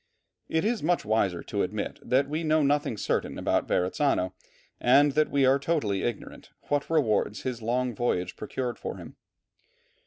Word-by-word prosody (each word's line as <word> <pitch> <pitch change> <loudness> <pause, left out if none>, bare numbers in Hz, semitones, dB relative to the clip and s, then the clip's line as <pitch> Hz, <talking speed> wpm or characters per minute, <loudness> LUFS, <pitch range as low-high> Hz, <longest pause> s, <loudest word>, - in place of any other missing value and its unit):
It 160 +3 0
is 230 +1 0
wiser 110 - +1
to - - -2
admit - - -3
that 130 +3 +1
we 155 +3 -2
know 155 -1 +3
nothing 145 -5 +1
certain - - -1
about - - 0
Verrazzano, 95 0 +1 0.5
and 140 +4 +5
that 155 +2 +2
we 140 -1 +3
are 135 +2 +4
totally 135 -11 0
ignorant 120 -3 -5 0.2
what 145 -1 0
rewards 110 -9 +1
his 125 -2 -3
long 125 +2 0
voyage 90 -6 -1
procured 120 +3 -4
for - - -5
him. - - -11
130 Hz, 155 wpm, -27 LUFS, 110-150 Hz, 0.5 s, and